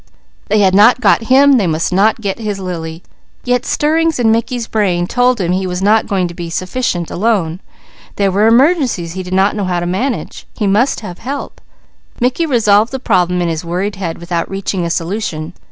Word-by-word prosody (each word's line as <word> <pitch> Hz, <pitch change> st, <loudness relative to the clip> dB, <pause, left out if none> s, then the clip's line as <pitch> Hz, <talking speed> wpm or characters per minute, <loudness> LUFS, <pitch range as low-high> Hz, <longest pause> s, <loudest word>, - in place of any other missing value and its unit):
They 215 Hz, 0 st, +2 dB
had 190 Hz, -2 st, +3 dB
not 215 Hz, +6 st, +5 dB
"got" 225 Hz, 0 st, +2 dB
him; 270 Hz, +1 st, +5 dB
they 195 Hz, -, 0 dB
must 160 Hz, +2 st, -1 dB
not 215 Hz, +4 st, +2 dB
"get" 200 Hz, 0 st, -3 dB
his 210 Hz, -3 st, -3 dB
Lily; 165 Hz, -2 st, -6 dB, 0.4 s
yet 250 Hz, -1 st, 0 dB
stirrings 320 Hz, +2 st, +1 dB
in 230 Hz, -3 st, +2 dB
Mickey's 235 Hz, +1 st, -1 dB
brain 190 Hz, -6 st, 0 dB
told 245 Hz, +4 st, +1 dB
him 175 Hz, -2 st, -1 dB
he 185 Hz, +1 st, -1 dB
was 180 Hz, 0 st, -3 dB
not 215 Hz, +2 st, +3 dB
going 190 Hz, -3 st, 0 dB
to 170 Hz, -, -8 dB
be 170 Hz, -1 st, -6 dB
sufficient, 180 Hz, 0 st, -2 dB
alone. 185 Hz, -5 st, 0 dB, 0.6 s
There 200 Hz, -1 st, +1 dB
were 205 Hz, +4 st, +2 dB
emergencies 245 Hz, -, +2 dB
he 185 Hz, -, -5 dB
did 180 Hz, 0 st, -8 dB
not 195 Hz, +2 st, +2 dB
know 205 Hz, -2 st, -2 dB
how 180 Hz, -1 st, -1 dB
to 175 Hz, -, -3 dB
manage. 225 Hz, +9 st, -3 dB
He 215 Hz, -, -1 dB
must 215 Hz, +7 st, +1 dB
have 180 Hz, -5 st, -8 dB
help. 275 Hz, +4 st, -6 dB, 0.6 s
Mickey 255 Hz, +7 st, 0 dB
revolved 220 Hz, -4 st, +3 dB
the 265 Hz, -, -3 dB
problem 180 Hz, -6 st, +1 dB
in -, -, -1 dB
his 160 Hz, 0 st, -3 dB
worried 185 Hz, +4 st, -3 dB
head 170 Hz, -4 st, -4 dB
without 170 Hz, 0 st, -3 dB
reaching 195 Hz, -2 st, -3 dB
a -, -, -2 dB
solution. 170 Hz, -2 st, -3 dB
200 Hz, 200 wpm, -15 LUFS, 175-235 Hz, 0.6 s, not